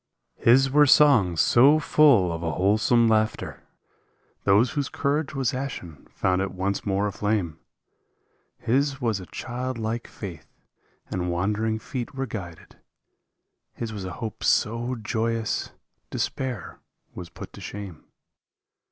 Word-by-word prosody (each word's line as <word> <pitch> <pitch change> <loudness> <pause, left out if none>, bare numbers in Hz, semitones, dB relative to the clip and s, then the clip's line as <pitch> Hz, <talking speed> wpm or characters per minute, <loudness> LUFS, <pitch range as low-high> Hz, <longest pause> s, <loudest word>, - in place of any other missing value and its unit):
His 135 +3 +5
were 145 +1 +5
songs 120 - +5
so 140 +6 +6
full 140 - +4
of 80 - -5
a 85 -2 -2
wholesome 110 +6 +3
laughter 110 -1 0 0.8
Those 105 +5 +4
whose 145 -2 -2
courage 145 +1 -1
was 135 -4 0
ashen 125 - -6
found 95 0 0
it 95 - -1
once 100 +2 -2
more 100 +1 +1
aflame, 100 -5 -1 1.0
His 140 +3 0
was 115 -6 0
a 90 - -10
child 125 +4 -5
like 115 +1 -3
faith 85 -7 -9 0.6
and 90 -1 -2
wandering 105 +5 0
feet 125 +3 -6
were 135 0 -2
guided. 95 -8 -8 1.0
His 115 -2 -5
was 100 -3 -6
a 95 - -5
hope 110 -3 -6
so 120 +3 +1
joyous 115 0 -2 0.4
despair 125 -7 -4 0.3
was 90 -2 -8
put - - -10
to - - -11
shame. 100 -5 -8
110 Hz, 130 wpm, -25 LUFS, 95-130 Hz, 1.0 s, so